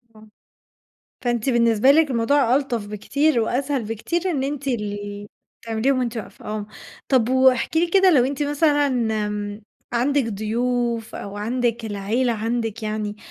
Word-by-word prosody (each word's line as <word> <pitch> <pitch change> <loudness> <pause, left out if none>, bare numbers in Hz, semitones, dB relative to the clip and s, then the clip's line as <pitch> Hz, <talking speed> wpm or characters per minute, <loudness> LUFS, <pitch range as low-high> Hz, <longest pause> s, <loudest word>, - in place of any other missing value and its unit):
آه، 215 0 -16 1.0
فأنت 240 0 0
بالنسبة 235 0 +4
لِك 305 0 +4
الموضوع 255 +1 +3
ألطف 245 -7 -2
بكتير 260 +7 +1
وأسهل 265 +4 -1
بكتير، 330 - -2
إن 275 -6 -1
أنتِ 280 0 -3
ال 205 -3 -4 0.4
تعمليهم 230 +4 +1
وأنتِ 245 -2 -2
واقفة، 220 - -8
آه، 210 -1 -4 0.4
طَب 250 -4 +3
واحكِ 260 +2 +3
لي 335 +2 +4
كده 380 +2 +4
لو 270 -8 +5
أنتِ 280 +3 -2
مثلًا 290 0 +2
امم، 210 -4 -2 0.3
عَندك 265 +3 +2
ضيوف 230 +2 -2
أو 200 0 -7
عَندك 235 +2 -1
العيلة، 220 +4 -1
عَندِك 225 0 -2
يعني 215 -1 -3
235 Hz, 140 wpm, -22 LUFS, 215-275 Hz, 1.0 s, لو